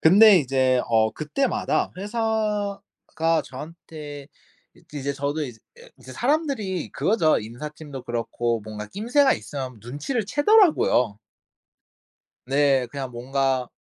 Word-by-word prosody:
근데 200 +4 +8
이제 130 -3 +2
어 110 -1 +3
그때마다 200 - -1
회사가 205 -6 -1
저한테 150 0 -9 0.5
이 - - -21
이제 140 -1 -2
저도 145 +3 -2
이제 125 -5 -6 0.4
이제 130 - -12
사람들이 245 - -1
그거죠. 185 -7 +2
인사팀도 140 +4 -8
그렇고 120 0 -2
뭔가 105 0 -7
낌새가 245 - +2
있으면 130 -5 -7
눈치를 145 - -3
채더라고요. 290 - +3 1.3
네. 135 -1 +2
그냥 135 0 -6
뭔가 130 +1 -1
145 Hz, 255 characters per minute, -24 LUFS, 130-205 Hz, 1.3 s, 근데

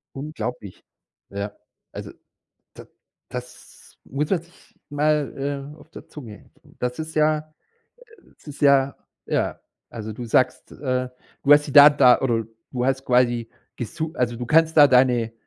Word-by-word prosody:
Unglaublich, 125 -8 -6 0.5
ja. 100 +1 -5 0.4
Also, - - -8 0.6
da - - -12 0.4
das 125 0 -11
muss 145 +2 -3
man 185 -4 +1
sich 170 +1 -24
mal, 145 -1 -2
äh, - - -20
auf - - -18
der - - -12
Zunge 115 -8 -12 0.3
das 125 0 -3
ist 160 0 -6
ja 155 0 +3
äh, - - -9 1.0
das - - -25
ist 145 - -10
ja, 140 -1 +4 0.3
ja. - - -2 0.3
Also, 110 -2 -7
du 120 +3 -7
sagst, 120 +3 0
äh, 130 -2 -3 0.3
du 145 - +7
hast 145 0 +4
die - - -6
Daten 145 +1 +8
da 125 -3 +6
oder 115 -4 0 0.3
du 125 -1 -2
hast 135 0 -1
quasi 120 -2 +1 0.3
gesu 155 +7 -5
also, 120 -1 -1
du 120 +1 -5
kannst 160 +4 +3
da 145 -1 +9
deine 125 -3 +3
135 Hz, 155 wpm, -23 LUFS, 125-150 Hz, 1.0 s, da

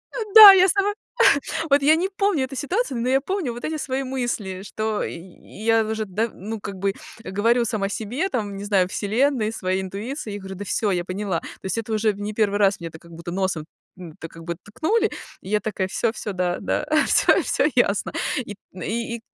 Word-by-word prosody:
А, - - -3 0.2
да, 425 -2 +13
я 375 -1 +6
сама. 400 +2 +1 0.8
Вот 280 0 +4
я 300 +3 +6
не 350 +4 0
помню 390 -7 0
эту 265 +1 -7
ситуацию, 285 - -1
но 240 - -1
я 265 +1 +3
помню 345 -4 -2
вот 240 - -9
эти 315 - -2
свои 270 -2 -2
мысли, 240 -8 -3
что 215 +1 -3
я 215 +6 -2
уже, 220 0 -2
да, 215 +5 -1
ну 220 +4 -6
как 200 - -7
бы 195 0 -1 0.3
говорю 230 +5 +1
сама 210 -3 -1
себе, 240 - -2
там, 205 - -3
не 200 - -6
знаю, 195 -3 +2
вселенной, 220 +3 0
своей 185 -3 -2
интуиции, 210 +6 -5
я - - -4
говорю: 190 -1 -8
"Да 205 - -6
всё, 205 +1 0
я 175 -2 0
поняла". 185 -1 -2
То - - -11 0.2
есть 190 - -2
это 225 0 -4
уже 215 0 +2
не 205 +1 -5
в - - -13
1 205 -2 +1
раз 195 -3 +2
мне 170 - -5
это 160 0 -12
как 170 +1 -18
будто 170 +1 -8
носом, 185 -4 -2 0.3
м, 170 -4 -10
так 165 - -7
как 165 0 -12
бы 170 0 -4
ткнули, 410 - 0 0.3
и 185 - -10
я 210 0 +2
такая: 195 -3 -2
"Всё, 225 +3 0
всё, 210 - -5
да, 180 -1 -1
да, - - -1 0.2
всё, - - +4
всё - - 0
ясно". - - +1 0.3
Ит 205 -2 -8 0.2
и 230 +6 -4
215 Hz, 215 wpm, -23 LUFS, 190-260 Hz, 0.8 s, да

